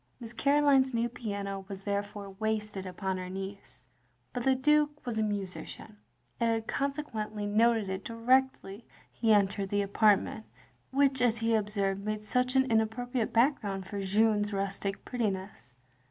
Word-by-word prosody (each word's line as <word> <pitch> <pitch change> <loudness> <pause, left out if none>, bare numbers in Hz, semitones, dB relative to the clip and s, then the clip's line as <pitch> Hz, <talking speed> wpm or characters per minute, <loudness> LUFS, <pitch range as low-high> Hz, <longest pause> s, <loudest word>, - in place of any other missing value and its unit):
Miss 230 -1 -8
Caroline's 275 -1 +3
new 230 +1 +1
piano 200 -4 -5
was 195 -1 -8
therefore 205 0 -3
wasted 210 -1 -3
upon 190 +1 -3
her 185 0 -5
niece; 195 +1 -8 0.5
but 245 - -2
the 265 +1 +4
Dtike 300 +3 +3 0.2
was 230 -3 -2
a - - +2
musician, 205 +1 -5 0.4
and 235 -1 +2
had 225 -1 0
consequently 225 -7 -3
noted 220 0 +3
it 190 +1 -4
directly 235 -2 +1 0.3
he 225 -1 +1
entered 200 -1 +2
the 205 0 +1
apartment 210 +1 +2 0.4
which, 270 -1 +2
as 235 -2 +3
he 225 +1 +1
observed, 200 -2 0
made 215 0 -3
such 250 +3 +1
an 265 0 +5
inappropriate 225 +2 0
backgrotind 225 -6 +1
for 200 +1 -5
Jeanne's 205 +1 +2
rustic 195 0 -3
prettiness. 190 - -4
215 Hz, 145 wpm, -30 LUFS, 200-240 Hz, 0.5 s, an